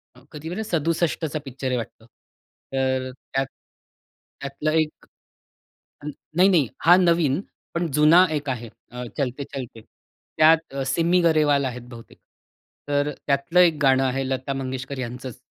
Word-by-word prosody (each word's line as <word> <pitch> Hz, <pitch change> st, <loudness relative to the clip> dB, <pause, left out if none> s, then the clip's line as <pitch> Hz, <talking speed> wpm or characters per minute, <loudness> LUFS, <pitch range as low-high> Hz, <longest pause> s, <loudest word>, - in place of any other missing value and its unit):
अ, -, -, -17 dB
कधीबर 165 Hz, +7 st, -5 dB
67 165 Hz, -2 st, -1 dB
picture 135 Hz, 0 st, -5 dB
आहे 125 Hz, -, 0 dB
वाटतं. 115 Hz, -1 st, -7 dB, 0.7 s
तर 130 Hz, -1 st, 0 dB, 0.2 s
त्यात 135 Hz, 0 st, +1 dB, 1.0 s
त्यातला 140 Hz, +3 st, -2 dB
1 155 Hz, -1 st, -3 dB, 1.3 s
नाही-नाही 180 Hz, -, +4 dB, 0.2 s
हा 175 Hz, +2 st, +8 dB
नवीन 170 Hz, -5 st, +2 dB, 0.3 s
पण 170 Hz, 0 st, 0 dB
जुना 155 Hz, +5 st, +6 dB
1 145 Hz, -2 st, -3 dB
आहे 120 Hz, -2 st, -4 dB, 0.5 s
चलते 140 Hz, -1 st, -2 dB
चलते. 125 Hz, -4 st, -7 dB, 0.6 s
त्यात 160 Hz, -2 st, +4 dB
सिमी 170 Hz, +6 st, +2 dB
गरेवाल 150 Hz, -4 st, +3 dB
आहेत 125 Hz, -1 st, -4 dB
बहुतेक. 115 Hz, -2 st, -13 dB, 0.7 s
तर 145 Hz, 0 st, +1 dB, 0.2 s
त्यातलं 140 Hz, +6 st, +2 dB
1 170 Hz, -3 st, +5 dB
गाणं 135 Hz, -1 st, +4 dB
आहे 130 Hz, +1 st, -1 dB
लता 130 Hz, +1 st, -2 dB
मंगेशकर 130 Hz, 0 st, -5 dB
यांचंच. 125 Hz, 0 st, -6 dB
140 Hz, 125 wpm, -23 LUFS, 130-165 Hz, 1.3 s, हा